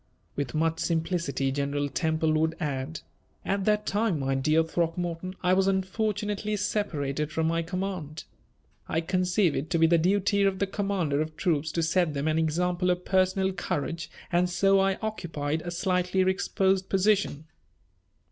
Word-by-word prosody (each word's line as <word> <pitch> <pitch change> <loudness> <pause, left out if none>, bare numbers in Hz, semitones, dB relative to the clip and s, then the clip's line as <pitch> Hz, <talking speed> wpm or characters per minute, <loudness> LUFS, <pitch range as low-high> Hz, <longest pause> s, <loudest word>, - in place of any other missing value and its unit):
With 140 -3 -3
much 165 +1 +1
simplicity 160 -5 -1
General 145 +1 -1
Temple 160 +1 0
would 160 +1 +1
add: 145 0 -3 0.4
"At 195 -1 -1
that 210 0 +2
time, 210 -4 +1
my 135 -1 -1
dear 155 +4 +3
Throckmorton, 170 +2 -2
I 180 - +4
was 190 +1 +3
unfortunately 210 +2 -1
separated 155 -8 -2
from 160 0 0
my 165 +1 +1
command. 180 -3 -4 0.7
I 160 - +1
conceive 180 0 +1
it 150 - -3
to 175 - +1
be 165 - +5
the 165 +1 +4
duty 200 +3 +2
of 195 -1 +2
the 200 - +1
commander 190 -7 -1
of 155 0 -5
troops 160 -4 0
to 165 - 0
set 165 -2 +1
them 140 +2 -1
an 155 +1 +2
example 175 +3 0
of 180 0 0
personal 190 0 +2
courage, 165 -1 -3 0.2
and 180 +1 +2
so 195 +2 +3
I 195 0 +2
occupied 160 -8 -2
a 175 - -5
slightly 180 +1 0
exposed 190 0 +1
position." 195 -6 +1
175 Hz, 155 wpm, -27 LUFS, 155-190 Hz, 0.7 s, be